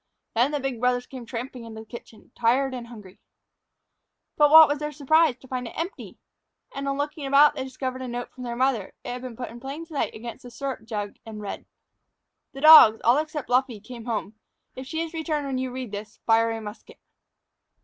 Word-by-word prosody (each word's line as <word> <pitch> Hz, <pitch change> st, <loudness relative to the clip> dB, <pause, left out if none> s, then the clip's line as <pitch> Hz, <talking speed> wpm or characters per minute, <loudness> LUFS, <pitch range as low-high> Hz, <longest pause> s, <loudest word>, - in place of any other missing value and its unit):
Then 240 Hz, +4 st, +3 dB
the 295 Hz, -1 st, -2 dB
big 270 Hz, -3 st, -3 dB
brothers 250 Hz, 0 st, +1 dB
came 250 Hz, -3 st, -10 dB
tramping 245 Hz, +1 st, -6 dB
into 220 Hz, -1 st, -9 dB
the -, -, -13 dB
kitchen, 230 Hz, -1 st, -12 dB
tired 260 Hz, +3 st, +1 dB
and 245 Hz, -2 st, -6 dB
hungry. 210 Hz, -6 st, -13 dB, 1.2 s
But 295 Hz, -1 st, +5 dB
what 315 Hz, +1 st, +10 dB
was 290 Hz, 0 st, -1 dB
their 300 Hz, 0 st, -3 dB
surprise 300 Hz, -1 st, +3 dB
to 265 Hz, -, -17 dB
find 250 Hz, -1 st, -4 dB
it -, -, -11 dB
empty. 340 Hz, +4 st, -5 dB, 0.6 s
And, 275 Hz, 0 st, -4 dB
on 275 Hz, 0 st, -1 dB
looking 290 Hz, 0 st, -3 dB
about, 280 Hz, +2 st, +6 dB
they 265 Hz, -, -4 dB
discovered 260 Hz, 0 st, -5 dB
a 255 Hz, -, -5 dB
note 245 Hz, 0 st, -5 dB
from 255 Hz, -, -10 dB
their 240 Hz, -1 st, -4 dB
mother. 250 Hz, -5 st, 0 dB
It -, -, -6 dB
had 245 Hz, 0 st, -5 dB
been 250 Hz, -2 st, -7 dB
put 245 Hz, +1 st, -6 dB
in 235 Hz, -, -10 dB
plain 275 Hz, +6 st, -7 dB
sight 315 Hz, -4 st, -3 dB
against 230 Hz, +1 st, -8 dB
the 245 Hz, -, -11 dB
syrup 245 Hz, -1 st, -5 dB
jug 205 Hz, -3 st, -5 dB
and 220 Hz, -2 st, -9 dB
read: 205 Hz, -2 st, -7 dB, 0.9 s
"_The 270 Hz, -, -7 dB
dogs, 310 Hz, -9 st, +10 dB
all 240 Hz, +5 st, +5 dB
except 310 Hz, -2 st, -4 dB
Luffree, 250 Hz, -2 st, +1 dB
came 230 Hz, +2 st, -10 dB
home. 220 Hz, -3 st, -3 dB, 0.4 s
If 260 Hz, 0 st, -8 dB
she 320 Hz, +3 st, -3 dB
has 330 Hz, 0 st, -5 dB
returned 315 Hz, -3 st, -2 dB
when 265 Hz, -2 st, -2 dB
you 260 Hz, 0 st, -2 dB
read 250 Hz, -3 st, -6 dB
this, 210 Hz, +1 st, -7 dB
fire 225 Hz, 0 st, +4 dB
a 225 Hz, 0 st, -3 dB
musket. 210 Hz, 0 st, -10 dB
255 Hz, 210 wpm, -25 LUFS, 230-280 Hz, 1.2 s, what